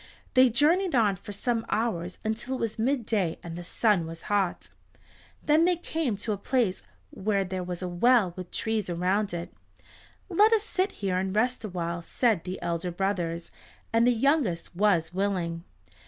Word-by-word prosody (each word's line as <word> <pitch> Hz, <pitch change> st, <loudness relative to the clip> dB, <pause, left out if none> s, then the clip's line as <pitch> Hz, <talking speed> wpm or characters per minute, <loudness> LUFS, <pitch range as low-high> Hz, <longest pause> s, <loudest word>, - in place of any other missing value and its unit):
They 255 Hz, -1 st, +6 dB
journeyed 320 Hz, -, +3 dB
on 210 Hz, -5 st, +3 dB
for 195 Hz, +2 st, -10 dB
some 225 Hz, +3 st, -1 dB
hours 185 Hz, -6 st, -1 dB
until 230 Hz, +4 st, -2 dB
it -, -, -5 dB
was 225 Hz, -1 st, -3 dB
midday 225 Hz, -, 0 dB
and 170 Hz, -1 st, -6 dB
the 175 Hz, -, -6 dB
sun 185 Hz, -1 st, +1 dB
was 165 Hz, 0 st, -8 dB
hot. 195 Hz, -3 st, 0 dB, 0.7 s
Then 310 Hz, +2 st, +4 dB
they 360 Hz, 0 st, +3 dB
came 320 Hz, -, -2 dB
to 215 Hz, +2 st, -3 dB
a 205 Hz, -, -2 dB
place 235 Hz, -4 st, 0 dB, 0.3 s
where 200 Hz, 0 st, 0 dB
there 185 Hz, 0 st, -3 dB
was 180 Hz, 0 st, -5 dB
a -, -, -2 dB
well 190 Hz, +1 st, +3 dB
with 180 Hz, -1 st, -7 dB
trees 220 Hz, -4 st, -1 dB
around 185 Hz, +4 st, 0 dB
it. 170 Hz, 0 st, -5 dB, 0.7 s
"Let 420 Hz, +5 st, +4 dB
us 435 Hz, -2 st, +3 dB
sit 385 Hz, -1 st, 0 dB
here 185 Hz, -2 st, -1 dB
and 190 Hz, +1 st, -2 dB
rest 245 Hz, +3 st, +1 dB
awhile," 170 Hz, -4 st, -3 dB
said 210 Hz, +2 st, 0 dB
the 185 Hz, +1 st, -4 dB
elder 170 Hz, +1 st, -2 dB
brothers, 175 Hz, -2 st, -2 dB, 0.4 s
and 230 Hz, +1 st, +4 dB
the -, -, +6 dB
youngest 235 Hz, -, +1 dB
was 175 Hz, -4 st, +2 dB
willing. 180 Hz, -3 st, -1 dB
205 Hz, 170 wpm, -27 LUFS, 180-240 Hz, 0.7 s, They